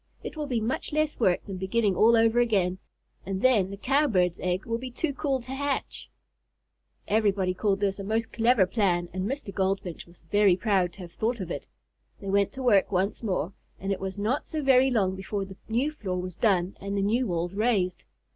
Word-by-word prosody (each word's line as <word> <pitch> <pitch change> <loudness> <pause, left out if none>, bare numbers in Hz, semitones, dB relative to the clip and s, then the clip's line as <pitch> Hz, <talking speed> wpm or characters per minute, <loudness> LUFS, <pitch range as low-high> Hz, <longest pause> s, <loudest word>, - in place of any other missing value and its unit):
It - - -6
will 300 -1 -4
be 245 -4 0
much 250 +10 -2
less 305 0 0
work 185 -7 +2
than 195 -3 -6
beginning 195 +1 +1
all 230 +4 +5
over 225 +1 +4
again, 190 -6 +1 0.4
and 195 0 -4
then 220 -8 +4
the 200 - -7
Cowbird's 210 - +2
egg 180 +3 -1
will 230 -1 -2
be 255 +1 -6
too 280 +4 -2
cool 275 -2 -1
to 250 +2 -10
hatch." 280 0 -3 1.0
Everybody 200 -4 +2
called 200 +1 0
this 195 -1 0
a - - -4
most 225 +3 -2
clever 230 -3 +4
plan, 180 -3 0
and 185 +3 -2
Mr. 270 -7 -5
Goldfinch 190 -3 -2
was 170 0 -20
very 205 -3 +5
proud 190 -5 +1
to 200 - -12
have 175 -2 -9
thought 235 +2 -1
of 180 -3 -5
it. - - -5 0.5
They 195 - -4
went 200 0 +2
to 265 - -6
work 205 -6 +4
once 195 +2 0
more, 190 -5 -2 0.3
and 195 +1 -3
it 195 - -1
was 190 +1 -5
not 220 +8 -1
so 310 -2 -3
very 265 -1 +5
long 195 -7 +1
before 195 +1 -4
the 190 -1 -11
new 250 +7 +1
floor 190 -11 -4
was 180 0 -5
done 190 -4 +1
and 200 +1 -3
the 195 - +1
new 235 +5 +1
walls 175 0 -2
raised. 200 -4 0
200 Hz, 210 wpm, -27 LUFS, 190-240 Hz, 1.0 s, all